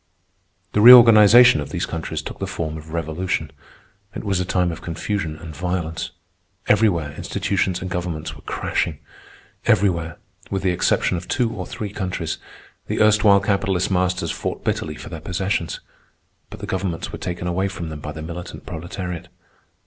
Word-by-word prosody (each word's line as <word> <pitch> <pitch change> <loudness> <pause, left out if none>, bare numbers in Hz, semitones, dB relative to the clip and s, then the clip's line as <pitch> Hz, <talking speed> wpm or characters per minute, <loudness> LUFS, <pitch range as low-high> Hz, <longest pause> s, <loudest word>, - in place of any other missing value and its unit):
The 105 - +3
reorganization 115 -4 +9
of 75 - -6
these - - -2
countries 80 -1 -4
took - - -8
the 95 - -3
form 85 -4 -4
of 80 0 -10
revolution. 80 -1 -2 0.6
It - - -5
was 100 -3 0
a 90 - -1
time 90 -1 +1
of 80 - -8
confusion 85 0 -3
and 80 -2 -9
violence. 85 -1 -3 0.6
Everywhere 95 -8 +3
institutions 90 -2 -1
and 95 - -5
governments 85 -3 -4
were - - -14
crashing. 80 -3 -2 0.7
Everywhere, 85 -5 +2 0.3
with 95 -1 -2
the 95 - +2
exception 90 +1 +1
of 90 - -7
two 120 -4 0
or 90 -3 -5
three 105 -2 -5
countries, 90 -5 -3 0.5
the - - -2
erstwhile 105 -2 +5
capitalist 100 -2 0
masters 90 -2 0
fought - - -4
bitterly - - -2
for - - -9
their - - -7
possessions. 95 -2 -2 0.7
But - - -10
the - - -4
governments 95 -3 -3
were - - -7
taken 90 -1 -4
away 90 +2 0
from 90 -4 -6
them 75 -1 -7
by 75 - -6
the 80 0 -7
militant 85 +2 -7
proletariat. 90 +1 -6
90 Hz, 165 wpm, -22 LUFS, 80-100 Hz, 0.7 s, reorganization